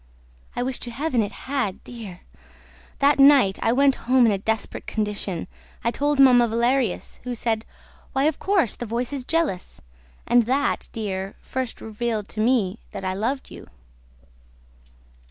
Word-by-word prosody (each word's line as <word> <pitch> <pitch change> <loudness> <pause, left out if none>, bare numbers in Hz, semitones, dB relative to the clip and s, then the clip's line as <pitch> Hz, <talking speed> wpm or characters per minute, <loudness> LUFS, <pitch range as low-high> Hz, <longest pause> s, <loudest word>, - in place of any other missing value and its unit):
I 245 - -1
wish 255 0 -3
to 240 - -6
Heaven 260 0 0
it 205 -1 -2
had, 260 -8 -2
dear!... 215 -7 -9 0.8
That 280 0 +3
night, 275 -8 +6
I 225 - +2
went 275 +2 +4 0.2
home 255 -1 +6
in 225 - +4
a 200 - 0
desperate 220 +2 -3
condition. 205 -5 -2 0.4
I 235 - +1
told 290 +2 0
Mamma 250 -3 +7
Valerius, 235 -1 0
who 250 0 -4
said, 225 -1 -1 0.5
'Why, 270 0 +1
of 305 0 +1
course, 380 - +2
the 240 - -6
voice 240 +4 -2
is 275 -3 -3
jealous!' 310 - -1 0.5
And 240 -1 +4
that, 275 +3 0
dear, 195 -3 -4
first 260 -3 -4
revealed 220 -1 -3
to 215 - -6
me 225 -4 +1
that 195 - -7
I 185 - 0
loved 230 +8 -2
you." - - -11
240 Hz, 155 wpm, -24 LUFS, 215-270 Hz, 0.8 s, Mamma